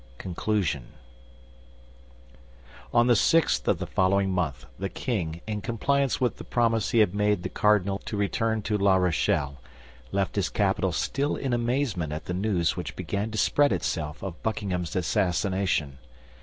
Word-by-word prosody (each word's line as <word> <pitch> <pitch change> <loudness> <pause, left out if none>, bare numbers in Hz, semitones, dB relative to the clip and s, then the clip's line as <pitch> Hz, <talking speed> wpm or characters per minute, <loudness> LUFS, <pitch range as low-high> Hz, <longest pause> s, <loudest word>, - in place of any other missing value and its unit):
CONCLUSION 90 - -2 2.0
On 120 0 +4
the 120 -1 +5
sixth 165 +9 +3
of - - +3
the - - -4
following 95 +1 +2
month 75 -8 -2
the 100 0 -2
king, 85 -11 -3
in 105 -1 -3
compliance 135 +6 0
with 125 -2 0
the - - -8
promise 115 -2 +1
he - - +1
had 105 -5 +4
made 105 -2 +1
the - - -3
cardinal 100 -2 +2
to 105 - -5
return 110 +2 0
to 105 +1 0
La 100 -1 +4
Rochelle, 80 -6 +1 0.5
left 100 -2 -1
his - - +1
capital - - +1
still 140 +2 -1
in 135 -3 -2
amazement 120 - 0
at 75 +1 -5
the 90 - -3
news 90 -3 +1
which - - -5
began 100 +2 -3
to 110 - -5
spread 145 +7 +3
itself 75 -3 -2
of 95 -4 -6
Buckingham's 95 -6 -2
assassination. 90 -5 0
100 Hz, 155 wpm, -27 LUFS, 90-115 Hz, 2.0 s, the